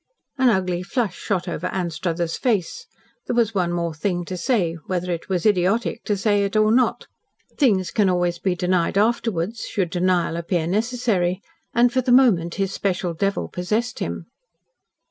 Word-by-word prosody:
An 260 Hz, -1 st, +5 dB
ugly 185 Hz, -4 st, 0 dB
flush 215 Hz, +3 st, -2 dB
shot 190 Hz, -4 st, -2 dB
over 180 Hz, -, -3 dB
Anstruthers' 170 Hz, -2 st, -2 dB
face. 235 Hz, -, -1 dB, 0.4 s
There -, -, -1 dB
was 230 Hz, -2 st, +2 dB
one 180 Hz, -3 st, 0 dB
more 170 Hz, -1 st, -2 dB
thing 175 Hz, +2 st, -2 dB
to 185 Hz, -, -5 dB
say 180 Hz, -4 st, 0 dB
whether 180 Hz, -1 st, -2 dB
it 170 Hz, +2 st, -4 dB
was 185 Hz, -1 st, -1 dB
idiotic 205 Hz, +3 st, +1 dB
to 205 Hz, -, 0 dB
say 205 Hz, 0 st, +2 dB
it 200 Hz, +1 st, -2 dB
or 215 Hz, 0 st, +4 dB
not. 250 Hz, +2 st, +2 dB, 0.5 s
Things 200 Hz, -, +2 dB
can 205 Hz, -3 st, +2 dB
always 175 Hz, -1 st, 0 dB
be 185 Hz, -2 st, 0 dB
denied 180 Hz, 0 st, 0 dB
afterwards, 220 Hz, -2 st, 0 dB
should 185 Hz, -4 st, -1 dB
denial 175 Hz, -2 st, +1 dB
appear 170 Hz, -1 st, -1 dB
necessary 205 Hz, -2 st, 0 dB, 0.4 s
and 240 Hz, +1 st, +4 dB
for 260 Hz, -, +2 dB
the 250 Hz, 0 st, 0 dB
moment 210 Hz, -10 st, +4 dB
his 195 Hz, -1 st, -1 dB
special 180 Hz, -3 st, -1 dB
devil 195 Hz, +4 st, -1 dB
possessed 215 Hz, +7 st, -2 dB
him. -, -, -4 dB
190 Hz, 165 wpm, -22 LUFS, 175-220 Hz, 0.5 s, An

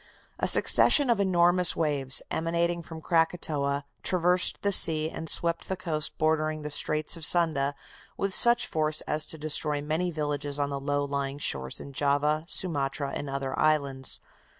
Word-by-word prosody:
A -, -, -1 dB
succession 285 Hz, -5 st, +4 dB
of 230 Hz, -, 0 dB
enormous 180 Hz, -2 st, +3 dB
waves, 140 Hz, -4 st, 0 dB
emanating 170 Hz, +1 st, -2 dB
from 160 Hz, -1 st, -11 dB
Krakatoa, 155 Hz, -4 st, -1 dB, 0.2 s
traversed 180 Hz, 0 st, 0 dB
the 200 Hz, -, 0 dB
sea, 160 Hz, -4 st, +5 dB
and 160 Hz, -, -7 dB
swept 170 Hz, 0 st, -1 dB
the 190 Hz, -, -3 dB
coast 155 Hz, -3 st, -3 dB
bordering 155 Hz, -1 st, -1 dB
the 150 Hz, -, -6 dB
Straits 155 Hz, +2 st, 0 dB
of 165 Hz, -, -10 dB
Sunda 150 Hz, -4 st, +2 dB, 0.4 s
with 195 Hz, -1 st, -2 dB
such 235 Hz, +3 st, +7 dB
force 155 Hz, -1 st, -1 dB
as 150 Hz, 0 st, -1 dB
to 160 Hz, -, -4 dB
destroy 150 Hz, -1 st, 0 dB
many 155 Hz, +5 st, -3 dB
villages 145 Hz, -3 st, -4 dB
on 145 Hz, -1 st, -3 dB
the 140 Hz, -, -4 dB
low 145 Hz, +1 st, -2 dB
lying 140 Hz, 0 st, -4 dB
shores 65 Hz, -, -3 dB
in 140 Hz, -, -11 dB
Java, 145 Hz, +3 st, -1 dB
Sumatra 140 Hz, -6 st, 0 dB
and 145 Hz, -, -6 dB
other 135 Hz, -1 st, -5 dB
islands. 140 Hz, -4 st, 0 dB
155 Hz, 160 wpm, -26 LUFS, 145-170 Hz, 0.4 s, such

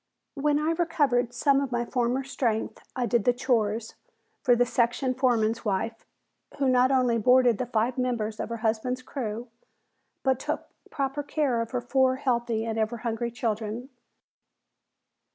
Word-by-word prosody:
When 290 Hz, 0 st, +1 dB
I 305 Hz, +2 st, +1 dB
recovered 290 Hz, -8 st, +1 dB
some 275 Hz, +3 st, +2 dB
of 275 Hz, -2 st, -3 dB
my 240 Hz, 0 st, 0 dB
former 250 Hz, +2 st, 0 dB
strength 245 Hz, -4 st, -2 dB
I 250 Hz, -1 st, 0 dB
did 235 Hz, -1 st, +1 dB
the 245 Hz, -, +4 dB
"chores" 230 Hz, -3 st, 0 dB, 0.5 s
for 250 Hz, -4 st, +4 dB
the 245 Hz, +1 st, +3 dB
section 245 Hz, +2 st, +1 dB
foreman's 230 Hz, -3 st, +1 dB
wife, 220 Hz, +2 st, -2 dB, 0.5 s
who 275 Hz, -1 st, +1 dB
not 255 Hz, 0 st, +4 dB
only 250 Hz, -3 st, +2 dB
boarded 250 Hz, -1 st, +4 dB
the 250 Hz, -, -2 dB
five 240 Hz, +2 st, 0 dB
members 225 Hz, -4 st, -1 dB
of -, -, -3 dB
her 230 Hz, -, -3 dB
husband's 250 Hz, +3 st, 0 dB
crew, 235 Hz, -3 st, -5 dB, 0.7 s
but 265 Hz, -2 st, +2 dB
took -, -, -3 dB, 0.2 s
proper 275 Hz, +1 st, -2 dB
care 285 Hz, -5 st, 0 dB
of 230 Hz, -, -4 dB
her 250 Hz, -2 st, -2 dB
four 260 Hz, +1 st, +2 dB
healthy 235 Hz, -4 st, 0 dB
and 225 Hz, -1 st, -2 dB
ever 220 Hz, +2 st, 0 dB
hungry 235 Hz, +1 st, -1 dB
children. 225 Hz, +1 st, -3 dB
245 Hz, 155 wpm, -27 LUFS, 230-260 Hz, 0.7 s, the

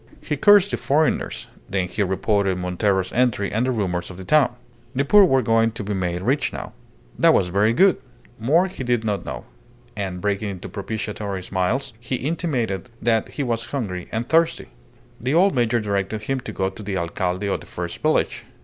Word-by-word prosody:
He 150 Hz, -, -3 dB
cursed 205 Hz, +6 st, +6 dB
the -, -, 0 dB
foreigners; 155 Hz, +3 st, 0 dB, 0.2 s
then 95 Hz, -2 st, 0 dB
he 90 Hz, +4 st, -3 dB
reported 100 Hz, 0 st, +1 dB
Montero's 95 Hz, +1 st, 0 dB
entry 120 Hz, -5 st, +1 dB
and 115 Hz, +4 st, 0 dB
the -, -, +2 dB
rumours 90 Hz, -6 st, -2 dB
of 90 Hz, -, -9 dB
the 95 Hz, -, -8 dB
town. 135 Hz, +2 st, +3 dB, 0.4 s
The 140 Hz, +2 st, +1 dB
poor 205 Hz, +6 st, +7 dB
were 135 Hz, -7 st, +3 dB
going 115 Hz, 0 st, +2 dB
to 115 Hz, -, -5 dB
be 105 Hz, +1 st, -3 dB
made 90 Hz, -2 st, -2 dB
rich 135 Hz, +5 st, +1 dB
now. -, -, -7 dB, 0.5 s
That -, -, +6 dB
was 90 Hz, -, +2 dB
very 100 Hz, +4 st, +3 dB
good. 190 Hz, +11 st, +4 dB, 0.4 s
More 155 Hz, +11 st, +3 dB
he 185 Hz, -8 st, -6 dB
did 120 Hz, -2 st, +1 dB
not 105 Hz, -3 st, -2 dB
know, 65 Hz, -4 st, -6 dB, 0.5 s
and, 95 Hz, -3 st, -4 dB
breaking 100 Hz, +2 st, -1 dB
into 95 Hz, -3 st, -7 dB
propitiatory 105 Hz, -2 st, -4 dB
smiles, 105 Hz, +9 st, -1 dB
he 125 Hz, +2 st, -3 dB
intimated 130 Hz, -, -2 dB
that 115 Hz, -2 st, +1 dB
he 145 Hz, -, 0 dB
was 120 Hz, -2 st, -2 dB
hungry 100 Hz, -11 st, -4 dB
and 115 Hz, +2 st, -2 dB
thirsty. 165 Hz, 0 st, +2 dB, 0.5 s
The 130 Hz, +6 st, 0 dB
old 190 Hz, +3 st, +5 dB
major 120 Hz, -1 st, +2 dB
directed 105 Hz, 0 st, -2 dB
him 135 Hz, +4 st, -1 dB
to 115 Hz, -, -7 dB
go 95 Hz, -2 st, -1 dB
to 110 Hz, -, -10 dB
the 100 Hz, -2 st, -3 dB
alcalde 90 Hz, +2 st, -2 dB
of 100 Hz, -, 0 dB
the -, -, -13 dB
first -, -, -6 dB
village. -, -, +1 dB
110 Hz, 195 wpm, -22 LUFS, 95-130 Hz, 0.5 s, poor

